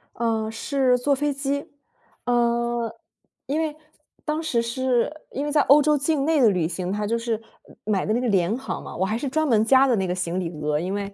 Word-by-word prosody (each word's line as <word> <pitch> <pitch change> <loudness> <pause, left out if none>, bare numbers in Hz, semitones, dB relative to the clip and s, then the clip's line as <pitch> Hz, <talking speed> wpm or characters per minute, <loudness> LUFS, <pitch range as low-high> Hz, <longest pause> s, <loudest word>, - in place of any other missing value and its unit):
嗯， 220 -1 -1
是 260 +1 +1
坐 280 +3 +1
飞 295 +1 0
机， 280 +1 -2 0.6
呃， 235 -1 +1 0.5
因 295 +4 -1
为 310 -2 -2 0.5
当 310 +1 -1
时 245 -7 +1
是 245 +1 0 0.2
因 280 +2 -3
为 295 - -2
在 295 - +4
欧 285 +2 +6
洲 300 0 +3
境 285 0 0
内 315 -2 +3
的 235 - +6
旅 180 -5 +1
行， 180 +1 -4
它 210 +1 -2
就 230 +2 0
是 230 -1 -2 0.4
买 200 -3 0
的 215 - 0
那 235 - +1
个 250 - -1
廉 195 -1 +2
航 265 - -5
嘛， - - -8
我 190 - 0
还 215 +4 -1
是 270 +2 -3
专 315 +3 0
门 220 -5 +4
加 265 +3 +5
的 245 - +3
那 190 - 0
个 180 - -1
行 180 -1 -2
李 175 -3 -2
额， 150 0 0
因 185 +4 -3
为 200 0 -4
235 Hz, 245 characters per minute, -24 LUFS, 210-280 Hz, 0.6 s, 欧